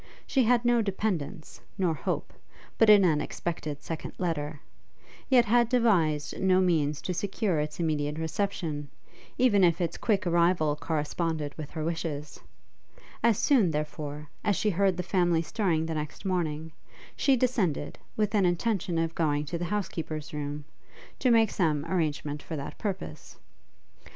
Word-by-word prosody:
She 265 Hz, -3 st, +2 dB
had 240 Hz, +1 st, +3 dB
no 240 Hz, -1 st, +4 dB
dependence, 190 Hz, -5 st, -3 dB, 0.2 s
nor 180 Hz, -4 st, +2 dB
hope, 155 Hz, -, -3 dB, 0.5 s
but 225 Hz, -, +6 dB
in 205 Hz, -2 st, +8 dB
an 155 Hz, -4 st, +3 dB
expected 155 Hz, -4 st, -4 dB
second 165 Hz, -1 st, -5 dB
letter, 155 Hz, -4 st, -2 dB, 0.7 s
yet 250 Hz, -3 st, +6 dB
had 235 Hz, +1 st, +3 dB
devised 180 Hz, -, +2 dB
no 185 Hz, -1 st, +4 dB
means 155 Hz, -5 st, +1 dB
to 180 Hz, -, -2 dB
secure 190 Hz, -1 st, -1 dB
its 150 Hz, +2 st, -3 dB
immediate 150 Hz, -2 st, -1 dB
reception, 160 Hz, -4 st, -2 dB, 0.5 s
even 230 Hz, -6 st, +4 dB
if 170 Hz, -1 st, +4 dB
its 170 Hz, -2 st, -1 dB
quick 210 Hz, -3 st, +1 dB
arrival 170 Hz, -3 st, +3 dB
corresponded 155 Hz, 0 st, -2 dB
with 155 Hz, -2 st, -7 dB
her 155 Hz, -, -4 dB
wishes. 160 Hz, -3 st, -4 dB, 0.8 s
As 230 Hz, -3 st, +3 dB
soon, 245 Hz, -, +4 dB
therefore, 150 Hz, -1 st, -4 dB, 0.2 s
as 205 Hz, -, +2 dB
she 210 Hz, -, +1 dB
heard 190 Hz, 0 st, +2 dB
the 180 Hz, -, -2 dB
family 175 Hz, -3 st, +2 dB
stirring 165 Hz, -3 st, 0 dB
the 160 Hz, -, -3 dB
next 150 Hz, +4 st, -5 dB
morning, 160 Hz, -4 st, -1 dB, 0.4 s
she 275 Hz, -, +3 dB
descended, 230 Hz, -, 0 dB, 0.2 s
with 210 Hz, -1 st, +1 dB
an 200 Hz, -4 st, +4 dB
intention 175 Hz, -1 st, 0 dB
of 165 Hz, 0 st, 0 dB
going 150 Hz, -3 st, 0 dB
to 165 Hz, +3 st, -4 dB
the 175 Hz, -, -2 dB
housekeeper's 165 Hz, -6 st, -3 dB
room, 145 Hz, 0 st, -4 dB, 0.5 s
to 255 Hz, -, +2 dB
make 225 Hz, -3 st, +5 dB
some 155 Hz, -5 st, +1 dB
arrangement 150 Hz, -4 st, -1 dB
for 160 Hz, -, -6 dB
that 140 Hz, -1 st, -6 dB
purpose. 195 Hz, -3 st, -5 dB
170 Hz, 150 wpm, -28 LUFS, 150-200 Hz, 0.8 s, in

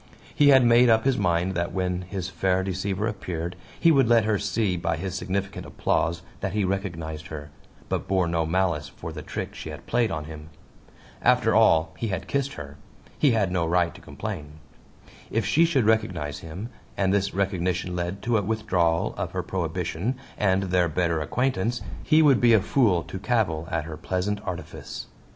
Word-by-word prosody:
He 145 Hz, -, +4 dB
had 135 Hz, -3 st, +7 dB
made 120 Hz, +1 st, +6 dB
up 110 Hz, +1 st, +4 dB
his 135 Hz, -1 st, +3 dB
mind 90 Hz, -1 st, +1 dB
that 85 Hz, -1 st, -1 dB
when 90 Hz, -1 st, -1 dB
his 95 Hz, 0 st, -5 dB
fair 95 Hz, +1 st, 0 dB
deceiver 95 Hz, +2 st, -2 dB
appeared 90 Hz, -5 st, -4 dB, 0.2 s
he 165 Hz, -, +5 dB
would 135 Hz, -5 st, +4 dB
let 115 Hz, -2 st, +4 dB
her 105 Hz, -2 st, +1 dB
see 100 Hz, -1 st, 0 dB
by 85 Hz, -2 st, -1 dB
his 95 Hz, +2 st, -4 dB
significant 95 Hz, +1 st, -3 dB
applause 85 Hz, +2 st, -1 dB, 0.2 s
that 95 Hz, -1 st, -3 dB
he 105 Hz, -1 st, +1 dB
recognized 85 Hz, -6 st, -3 dB
her, 75 Hz, -1 st, -8 dB, 0.4 s
but -, -, -2 dB
bore 95 Hz, -2 st, +2 dB
no 85 Hz, -1 st, +1 dB
malice 85 Hz, -4 st, 0 dB
for -, -, -8 dB
the -, -, -6 dB
trick -, -, -5 dB
she -, -, -7 dB
had -, -, -9 dB
played 120 Hz, -2 st, +1 dB
on 80 Hz, -2 st, -3 dB
him. 75 Hz, 0 st, -9 dB, 0.7 s
After -, -, +4 dB
all, 80 Hz, 0 st, +4 dB
he 115 Hz, -, -1 dB
had 95 Hz, -3 st, -3 dB
kissed 140 Hz, 0 st, -1 dB
her 75 Hz, 0 st, -9 dB, 0.4 s
he 140 Hz, -5 st, +4 dB
had 100 Hz, -5 st, +1 dB
no 90 Hz, -2 st, +1 dB
right 85 Hz, 0 st, +2 dB
to -, -, -14 dB
complain. 75 Hz, 0 st, -6 dB, 0.8 s
If 115 Hz, -2 st, 0 dB
she 165 Hz, -, +4 dB
should 140 Hz, -9 st, +2 dB
recognize 90 Hz, -10 st, 0 dB
him, 90 Hz, +8 st, -7 dB, 0.3 s
and 95 Hz, -1 st, +2 dB
this 100 Hz, -1 st, 0 dB
recognition 90 Hz, -2 st, -1 dB
led 90 Hz, +3 st, -3 dB
to 120 Hz, -1 st, +2 dB
a -, -, 0 dB
withdrawal 95 Hz, -6 st, +1 dB
of -, -, -3 dB
her -, -, -2 dB
prohibition, 90 Hz, +5 st, -2 dB, 0.2 s
and 95 Hz, -1 st, +2 dB
their 90 Hz, -2 st, +2 dB
better 85 Hz, 0 st, 0 dB
acquaintance, 120 Hz, -, 0 dB, 0.2 s
he 160 Hz, 0 st, +4 dB
would 140 Hz, -4 st, +5 dB
be 120 Hz, -1 st, +6 dB
a 110 Hz, -, +7 dB
fool 100 Hz, -, +2 dB
to 95 Hz, -, -7 dB
cavil 100 Hz, -8 st, 0 dB
at 80 Hz, -1 st, -1 dB
her 80 Hz, 0 st, -7 dB
pleasant 100 Hz, +3 st, -2 dB
artifice. 90 Hz, -1 st, -6 dB
95 Hz, 185 wpm, -25 LUFS, 85-110 Hz, 0.8 s, had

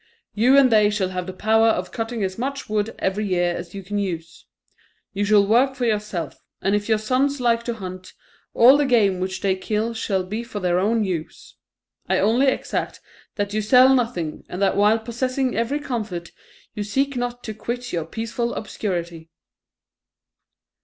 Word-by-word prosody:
You 250 Hz, +6 st, +4 dB
and 265 Hz, -3 st, +6 dB
they 210 Hz, -2 st, +5 dB
shall 205 Hz, -3 st, -1 dB
have 180 Hz, -1 st, -4 dB
the -, -, -4 dB
power 220 Hz, +4 st, +2 dB
of 185 Hz, -5 st, 0 dB
cutting 225 Hz, -1 st, -3 dB
as 190 Hz, -1 st, -2 dB
much 275 Hz, +3 st, -3 dB
wood 215 Hz, +1 st, -1 dB
every 205 Hz, +2 st, -1 dB
year 175 Hz, -2 st, +1 dB
as 175 Hz, +2 st, -8 dB
you 195 Hz, -, -6 dB
can 205 Hz, +2 st, -3 dB
use; 165 Hz, -4 st, -5 dB, 0.7 s
you 205 Hz, +1 st, -1 dB
shall 205 Hz, -1 st, +4 dB
work 250 Hz, +6 st, +3 dB
for 255 Hz, -2 st, -2 dB
yourself; 210 Hz, -7 st, -3 dB, 0.2 s
and 195 Hz, -, 0 dB
if 205 Hz, +1 st, -1 dB
your 220 Hz, -, +4 dB
sons 265 Hz, +6 st, 0 dB
like 235 Hz, -2 st, +2 dB
to 235 Hz, -, -2 dB
hunt, 185 Hz, -3 st, -8 dB, 0.4 s
all 255 Hz, +4 st, +7 dB
the 290 Hz, -1 st, +1 dB
game 205 Hz, -7 st, +3 dB
which 185 Hz, +1 st, -3 dB
they 195 Hz, -1 st, +1 dB
kill 215 Hz, +4 st, -2 dB
shall 195 Hz, -4 st, -1 dB
be 215 Hz, +5 st, -4 dB
for 225 Hz, -3 st, -6 dB
their 180 Hz, -2 st, +1 dB
own 220 Hz, +3 st, +1 dB
use. 175 Hz, -5 st, -5 dB, 0.6 s
I -, -, +3 dB
only 230 Hz, +7 st, +3 dB
exact 265 Hz, -, -2 dB, 0.4 s
that 205 Hz, -1 st, -2 dB
you 215 Hz, -, 0 dB
sell 255 Hz, +5 st, +6 dB
nothing, 225 Hz, -11 st, -1 dB
and 180 Hz, -, -5 dB
that 195 Hz, -, +2 dB
while 210 Hz, +2 st, +4 dB
possessing 255 Hz, +3 st, -2 dB
every 235 Hz, +6 st, 0 dB
comfort, 215 Hz, -11 st, -4 dB, 0.4 s
you 210 Hz, -, -5 dB
seek 270 Hz, +7 st, -1 dB
not 245 Hz, 0 st, -3 dB
to 220 Hz, -, -5 dB
quit 245 Hz, +3 st, -5 dB
your 165 Hz, -2 st, -1 dB
peaceful 230 Hz, +5 st, -3 dB
obscurity." 170 Hz, -6 st, -4 dB
215 Hz, 180 wpm, -22 LUFS, 190-240 Hz, 0.7 s, all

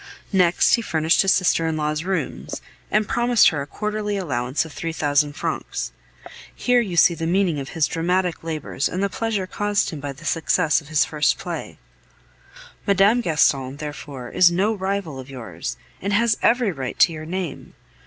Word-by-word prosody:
Next 180 Hz, -2 st, +4 dB
he 235 Hz, -, +4 dB
furnished 160 Hz, -5 st, +2 dB
his 195 Hz, -, +3 dB
sister 170 Hz, -3 st, +2 dB
in 160 Hz, -1 st, -1 dB
law's 150 Hz, +1 st, -1 dB
rooms, 185 Hz, -6 st, -3 dB, 0.3 s
and 215 Hz, 0 st, +1 dB
promised 240 Hz, -1 st, +4 dB
her 150 Hz, -3 st, -3 dB
a 140 Hz, -, -6 dB
quarterly 210 Hz, +3 st, -3 dB
allowance 130 Hz, -6 st, -1 dB
of 160 Hz, -, -11 dB
three 165 Hz, 0 st, -4 dB
thousand 145 Hz, -1 st, +1 dB
francs. -, -, -3 dB, 0.6 s
Here 245 Hz, -1 st, +3 dB
you 185 Hz, -7 st, -4 dB
see 170 Hz, -, +6 dB
the 165 Hz, 0 st, -3 dB
meaning 175 Hz, -3 st, +1 dB
of 135 Hz, 0 st, -6 dB
his 160 Hz, -, +4 dB
dramatic 180 Hz, +1 st, -1 dB
labors 155 Hz, -3 st, -2 dB
and 185 Hz, +2 st, -2 dB
the 200 Hz, -, +1 dB
pleasure 220 Hz, -3 st, -2 dB
caused 205 Hz, +2 st, 0 dB
him 155 Hz, -, -6 dB
by 140 Hz, 0 st, -5 dB
the 145 Hz, +5 st, -14 dB
success 165 Hz, -1 st, +2 dB
of 150 Hz, -, -16 dB
his 155 Hz, -1 st, +2 dB
first 150 Hz, -1 st, +1 dB
play. -, -, -6 dB, 1.1 s
Mme. 200 Hz, +4 st, +4 dB
Gaston, 140 Hz, -, +1 dB
therefore, 145 Hz, -4 st, -7 dB
is 180 Hz, -, +5 dB
no 190 Hz, +6 st, +1 dB
rival 190 Hz, -7 st, -3 dB
of 130 Hz, +1 st, -10 dB
yours, 110 Hz, -11 st, -6 dB, 0.2 s
and 200 Hz, +2 st, -2 dB
has 230 Hz, +1 st, +3 dB
every 235 Hz, -3 st, +3 dB
right 135 Hz, -6 st, -5 dB
to 170 Hz, -, +5 dB
your 155 Hz, 0 st, -7 dB
name. 180 Hz, -4 st, -5 dB
165 Hz, 180 wpm, -22 LUFS, 150-200 Hz, 1.1 s, see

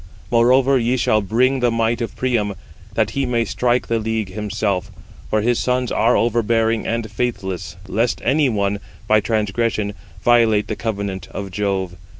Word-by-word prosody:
Moreover 130 Hz, +3 st, +4 dB
ye 120 Hz, +2 st, +1 dB
shall 110 Hz, -3 st, +2 dB
bring 125 Hz, +7 st, +2 dB
the 125 Hz, -1 st, +3 dB
might 115 Hz, +1 st, 0 dB
of 115 Hz, -, -4 dB
Priam, 115 Hz, -6 st, 0 dB, 0.4 s
that 110 Hz, -1 st, +1 dB
he 140 Hz, +4 st, -1 dB
may 120 Hz, -2 st, +1 dB
strike 125 Hz, +3 st, 0 dB
the 115 Hz, -1 st, 0 dB
league 110 Hz, -2 st, -2 dB
himself, 105 Hz, -2 st, -2 dB, 0.4 s
for 110 Hz, -, +1 dB
his 120 Hz, +2 st, +1 dB
sons 125 Hz, -1 st, 0 dB
are 115 Hz, +3 st, +3 dB
overbearing 115 Hz, -1 st, +1 dB
and 115 Hz, -2 st, -2 dB
faithless; 95 Hz, -6 st, -3 dB
lest 115 Hz, +5 st, 0 dB
any 140 Hz, +2 st, +3 dB
one, 100 Hz, -2 st, 0 dB, 0.3 s
by 110 Hz, 0 st, +5 dB
transgression, 105 Hz, 0 st, -1 dB, 0.3 s
violate 115 Hz, -3 st, +4 dB
the 110 Hz, -, -1 dB
covenant 100 Hz, -4 st, -4 dB
of 100 Hz, -1 st, -6 dB
Jove. 95 Hz, -2 st, -2 dB
110 Hz, 160 wpm, -20 LUFS, 105-120 Hz, 0.4 s, by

